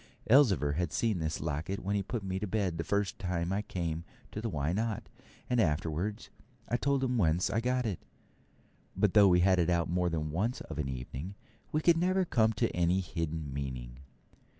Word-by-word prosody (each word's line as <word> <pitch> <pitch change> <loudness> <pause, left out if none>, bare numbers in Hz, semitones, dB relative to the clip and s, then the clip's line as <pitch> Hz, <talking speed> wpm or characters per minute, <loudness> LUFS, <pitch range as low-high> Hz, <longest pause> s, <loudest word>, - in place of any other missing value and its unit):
Elzevir 110 - +5
had 85 -3 -1
seen 110 -6 0
this 80 0 -2
locket 80 +5 -2
when 100 +2 -2
he 100 - +1
put 105 +2 -4
me 95 0 -2
to 105 - -3
bed 95 -4 -1
the - - 0
first 100 +4 -1
time 90 -1 -1
I 100 - 0
came 85 -5 -3 0.3
to 105 - -5
the 115 - -2
Why 75 -2 -1
Not? 110 +2 -1 0.4
and 125 -1 +1
afterwards 85 +5 -1 0.4
I 120 - 0
told 140 +1 +1
him 125 -2 +1
whence 85 -1 +2
I 110 - +1
got 125 +1 0
it; 100 -6 -2 1.0
but - - +3
though 105 -2 +7
we 90 -1 +5
had 95 0 +4
it 85 0 +2
out 85 -1 +1
more 90 0 +1
than 75 -2 -2
once 105 +10 -1
of 80 -2 -7
an 70 -3 -1
evening, 65 +8 -6 0.4
we 155 - +1
could 170 +1 +5
never 185 +2 +2
come 110 -8 +3
at - - +2
any 90 +2 +2
hidden 80 -5 -3
meaning. 65 -3 -5
90 Hz, 200 wpm, -31 LUFS, 80-110 Hz, 1.0 s, though